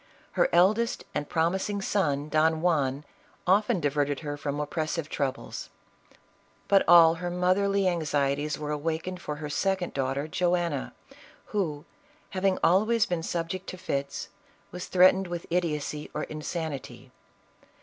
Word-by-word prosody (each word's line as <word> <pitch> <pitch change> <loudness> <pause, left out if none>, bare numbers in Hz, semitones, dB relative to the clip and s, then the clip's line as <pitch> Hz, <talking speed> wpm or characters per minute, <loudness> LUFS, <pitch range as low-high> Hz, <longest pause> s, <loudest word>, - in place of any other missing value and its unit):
Her - - +2
eldest 210 +7 +3
and 150 - -3
prom 165 +1 +2
ising 200 +1 -2
son 150 -8 0
Don 155 +1 +2
Juan, 145 -5 +1 0.4
often 205 +3 +3
diverted 145 -1 0
her 145 -2 -4
from 145 0 -3
oppressive 155 +1 -2
troubles; 140 -3 -3 1.0
but 200 -1 +5
all 165 -2 +8
her 175 - -2
motherly 190 +2 +2
anxieties 150 -3 0
were 150 0 -4
awaken 160 +4 -2
ed 180 - -10
for 150 - -4
her 150 0 -6
second 185 +4 -1
daughter 135 +2 -1
Joanna, 175 -4 0 0.6
who, 155 -8 -1 0.5
having 190 0 +1
al 185 +4 +5
ways 230 -2 +3
been 175 -2 -2
subject 170 +3 -3
to 185 - -6
fits, 140 -5 -3 0.4
was 180 0 -6
threatened 185 +1 +5
with 175 -1 -5
idiocy 150 -4 -1
or 150 - -1
insanity. 150 -6 -5
165 Hz, 140 wpm, -27 LUFS, 150-185 Hz, 1.0 s, all